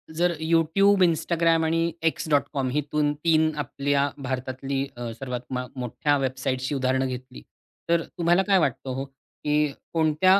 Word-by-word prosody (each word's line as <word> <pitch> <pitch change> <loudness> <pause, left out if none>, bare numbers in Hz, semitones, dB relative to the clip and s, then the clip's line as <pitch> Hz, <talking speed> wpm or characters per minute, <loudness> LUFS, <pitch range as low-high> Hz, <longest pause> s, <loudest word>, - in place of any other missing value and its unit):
जर 175 +1 +2
YouTube, 165 +5 +3
Instagram 165 0 +2
आणि 165 +1 +1 0.2
X.com 145 -4 0
हितून 150 +1 0
3 160 -1 +4
आपल्या 140 +1 0 0.2
भारतातली 130 +1 -2
अ, 120 -1 -4
सर्वात 125 -2 -4
मा 125 0 -2
मोठ्या 130 +4 0
वेबसाईटची 130 0 -2
उदाहरणं 130 0 +1
घेतली. 130 0 -7 0.5
तर 170 0 +3
अ, - - -8
तुम्हाला 175 +2 +3
काय 195 - +5
वाटतं 135 -3 -1
हो, 135 - -3
की 150 +2 -2 0.3
कोणत्या 165 +4 +4
145 Hz, 140 wpm, -25 LUFS, 130-165 Hz, 0.5 s, काय